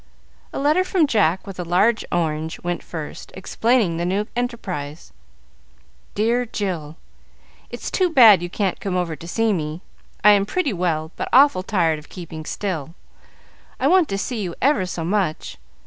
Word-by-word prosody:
A - - -6
letter 300 +6 +3
from 370 -3 +2
Jack, 195 - +1
with 195 -2 -9
a - - -1
large 190 +7 +2
orange, 160 -2 -1
went 175 0 -2
first, 160 -3 -8
explaining 210 -1 +1
the 170 - -2
new 195 +4 0
enterprise: 180 - -4 1.0
"Dear 230 +4 +1
Jill, 180 -9 -4 0.7
It's - - -6
too 365 -1 +2
bad 225 - +7
you 175 - -4
can't 195 0 -2
come 195 -2 -3
over 170 -3 -2
to 165 +3 -11
see 225 +4 +1
me. 155 -1 -4 0.4
I 210 - +8
am 200 -1 +3
pretty 295 - 0
well, 165 -3 -1
but - - -3
awful 265 -6 +5
tired 170 -6 +1
of 150 - -17
keeping 165 -3 -8
still. 165 -6 -4 0.8
I - - -1
want 360 -1 +4
to 195 - -1
see 220 +2 -3
you 175 -4 -4
ever 250 -9 +2
so 170 -2 -4
much. 175 - -2
185 Hz, 165 wpm, -22 LUFS, 165-230 Hz, 1.0 s, I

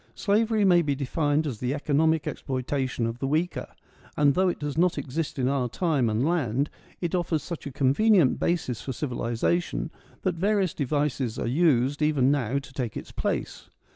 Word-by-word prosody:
Slavery 215 0 +2
may 175 -2 +6
be 145 -4 0
defined 145 +2 0
as 125 -8 -4
the 125 +3 -1
economic 155 +2 +2
exploita 130 0 -2
tion 120 -2 -2
of 115 +1 -4
the 135 - -1
weaker; 160 +5 -1 0.5
and, 145 -1 +4
though 185 +3 +3
it - - -2
does 145 -1 -4
not 175 +1 +2
exist 145 +3 -3
in 130 -1 +1
our 130 -2 0
time 145 -5 +1
and 110 +5 +1
land, 140 -5 0 0.3
it 175 -1 -2
offers 170 -4 0
such 170 -5 -6
a - - -5
convenient 145 - +3
basis 130 -9 -1
for 130 - -4
civilisation 130 +6 -1 0.3
that 185 - +1
various 195 +1 +1
devices 140 -4 -1
are - - -2
used 140 0 +2
even 145 -3 +3
now 135 -2 0
to 140 -1 -7
take 125 -5 -3
its - - -8
place. - - -3
145 Hz, 180 wpm, -26 LUFS, 130-170 Hz, 0.5 s, may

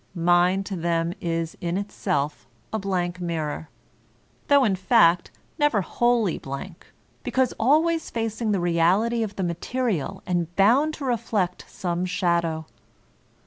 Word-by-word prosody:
Mind 175 +3 +3
to 195 - -4
them 170 0 0
is 165 -1 -2
in 170 +1 -1
itself 150 -10 -2 0.3
a 220 - 0
blank 180 -2 -2
mirror, 160 -3 -3 0.8
though 285 -1 +5
in 205 -6 +2
fact 185 -3 +4 0.3
never 295 -9 +3
wholly 235 -4 +1
blank, 140 +6 -8 0.3
because 260 -1 0
always 315 +7 +2
facing 225 -1 -2
the 200 - +1
reality 175 +7 +2
of 210 -2 -3
the 190 - -2
material 190 - -2
and 175 -1 -2
bound 265 +11 +4
to 280 - -6
reflect 210 -7 -1
some 175 -1 -3
shadow. 170 -3 0
185 Hz, 130 wpm, -24 LUFS, 170-225 Hz, 0.8 s, though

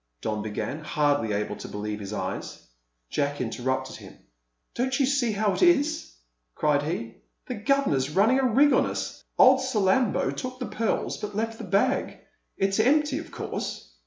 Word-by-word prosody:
Don 105 -1 -2
began, 110 +8 -4
hardly 145 -7 +1
able 105 0 -2
to - - -8
believe 105 0 -4
his 100 -1 -7
eyes. 95 -2 -5 0.5
Jack 145 0 -1
interrupted 130 +2 -2
him. - - -13 0.6
"Don't 260 +3 -1
you 275 - +4
see 265 -4 +1
how 205 -1 +1
it - - -3
is?" 315 -3 +2 0.4
cried 150 -1 +2
he. 145 -7 -4 0.3
"The 250 - -4
governor's 210 - +1
running 210 - +3
a 265 - +2
rig 285 +6 +5
on - - +3
us. - - -5
Old 260 +1 +7
Salambo 225 -2 +2
took 255 0 -5
the 255 - -4
pearls, 225 -1 -1
but 205 -1 -6
left 225 +1 -2
the 230 - -6
bag; 195 +2 +1 0.4
it's 195 +1 +1
empty, 290 +4 +3
of 330 - -9
course!" - - -5
205 Hz, 165 wpm, -26 LUFS, -, 0.6 s, Old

